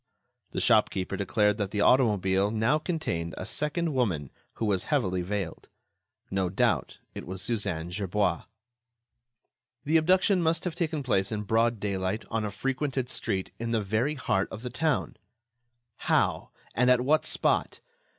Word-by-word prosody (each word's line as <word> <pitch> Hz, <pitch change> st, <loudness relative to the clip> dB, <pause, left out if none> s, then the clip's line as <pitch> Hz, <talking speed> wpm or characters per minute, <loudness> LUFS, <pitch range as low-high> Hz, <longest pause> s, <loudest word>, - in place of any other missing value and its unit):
The -, -, -3 dB
shopkeeper 95 Hz, +1 st, +2 dB
declared 105 Hz, +2 st, +1 dB
that 100 Hz, -2 st, -1 dB
the 105 Hz, 0 st, -1 dB
automobile 100 Hz, -6 st, +3 dB
now 110 Hz, +7 st, +2 dB
contained 150 Hz, -, -3 dB
a -, -, -5 dB
second 155 Hz, +2 st, -2 dB
woman 90 Hz, -, -1 dB, 0.2 s
who 115 Hz, -, -3 dB
was 100 Hz, -3 st, +1 dB
heavily 95 Hz, -, 0 dB
veiled. 95 Hz, -2 st, -4 dB, 0.6 s
No 95 Hz, -2 st, 0 dB
doubt, 95 Hz, -, 0 dB, 0.2 s
it -, -, -8 dB
was 95 Hz, 0 st, -3 dB
Suzanne 95 Hz, -7 st, -2 dB
Gerbois. 95 Hz, -2 st, -1 dB, 1.4 s
The 155 Hz, +3 st, +4 dB
abduction 185 Hz, +3 st, +3 dB
must 165 Hz, 0 st, +1 dB
have 180 Hz, -, -2 dB
taken 160 Hz, -4 st, -2 dB
place 100 Hz, -6 st, +1 dB
in 105 Hz, -1 st, -2 dB
broad 115 Hz, +2 st, +1 dB
daylight, 100 Hz, +1 st, -2 dB
on 115 Hz, -1 st, 0 dB
a 105 Hz, -, -2 dB
frequented 130 Hz, +3 st, -2 dB
street, 95 Hz, -7 st, -2 dB
in 115 Hz, 0 st, -2 dB
the 110 Hz, -, +2 dB
very 110 Hz, +9 st, 0 dB
heart 95 Hz, -7 st, 0 dB
of 110 Hz, +2 st, -8 dB
the 125 Hz, -, -4 dB
town. 150 Hz, +3 st, -1 dB, 0.8 s
How? -, -, +1 dB, 0.2 s
And 125 Hz, +1 st, +3 dB
at 125 Hz, -1 st, +5 dB
what 150 Hz, +5 st, +3 dB
spot? -, -, 0 dB
110 Hz, 150 wpm, -28 LUFS, 95-135 Hz, 1.4 s, at